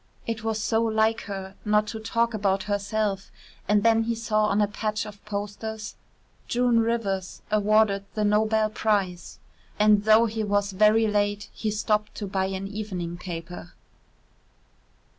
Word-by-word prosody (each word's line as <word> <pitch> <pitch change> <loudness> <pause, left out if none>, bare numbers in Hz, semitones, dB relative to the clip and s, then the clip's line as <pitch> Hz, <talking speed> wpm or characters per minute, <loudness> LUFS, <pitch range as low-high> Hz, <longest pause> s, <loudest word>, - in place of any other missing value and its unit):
It 225 -1 -4
was 220 -1 -1
so 220 +1 +1
like 220 0 +1
her 195 -2 -6
not 210 0 +2
to 220 - -5
talk 230 +1 0
about 195 -2 0
herself, 205 0 -2 0.4
and 210 0 +3
then 225 0 +4
he 230 0 -1
saw 215 -2 +1
on 210 0 +1
a 210 - +3
patch 215 +1 -3
of 210 -1 -11
posters: 210 +1 -5 0.5
"June 240 -1 +2
Rivers 215 -5 -2
awarded 210 -1 +3
the 215 - 0
Nobel 215 +1 +2
prize," 200 -5 -1 0.4
and 210 -1 +4
though 220 +1 +6
he 220 -1 -2
was 205 -1 0
very 215 +3 +4
late 205 -1 0
he 220 - -3
stopped 210 0 -1
to 210 - -4
buy 190 -1 -1
an 190 0 -4
evening 195 -5 -5
paper. 175 -1 -7
210 Hz, 150 wpm, -25 LUFS, 200-220 Hz, 0.5 s, though